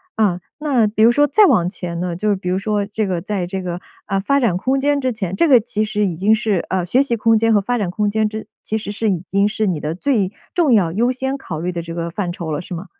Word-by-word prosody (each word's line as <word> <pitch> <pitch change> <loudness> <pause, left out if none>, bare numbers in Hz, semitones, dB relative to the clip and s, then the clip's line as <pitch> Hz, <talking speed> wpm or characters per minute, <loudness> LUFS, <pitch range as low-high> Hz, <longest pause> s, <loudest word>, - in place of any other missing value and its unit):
啊， 200 -5 +1 0.2
那 270 -7 +2
比 215 +1 +1
如 230 - +7
说 290 +4 +3
再 410 +9 +5
往 175 - +3
前 175 -3 -5
呢？ 175 -1 -2
就 210 +3 0
比 185 -1 -5
如 185 - +1
说 205 +1 -1
这 210 +1 -2
个 180 -3 -2
在 195 -1 -2
这 190 +2 -4
个， 180 -1 -5 0.2
呃， 195 -1 -1
发 275 +9 +1
展 235 -9 +1
空 260 +8 0
间 285 +1 +1
之 260 -1 0
前， 190 -5 -4
这 335 - +3
个 260 -5 +7
其 215 -1 -2
实 210 -1 0
已 175 - -3
经 200 +6 +3
是， 215 -5 0
呃， 185 -2 0
学 250 +10 +3
习 245 -4 0
空 225 0 +3
间 225 +1 +2
和 210 - +5
发 245 +5 -1
展 200 -6 -2
空 210 +2 0
间 215 +1 +1
之 220 0 -7 0.2
其 220 - -2
实 210 -2 -5
是 215 +1 -1
已 180 - -1
经 200 +1 +2
是 215 0 -1
你 175 -5 -1
的 150 +1 -2
最 200 0 0 0.2
重 335 -9 +3
要 185 -7 +3
优 235 +6 +2
先 265 +2 -2
考 165 - -6
虑 175 +3 -2
的 170 -1 -4
这 165 0 -7
个 170 0 -3
范 175 +1 -3
畴 170 -2 -5
了， 150 +1 -2
是 180 - -8
吗？ 175 +2 -6
205 Hz, 305 characters per minute, -19 LUFS, 180-230 Hz, 0.2 s, 如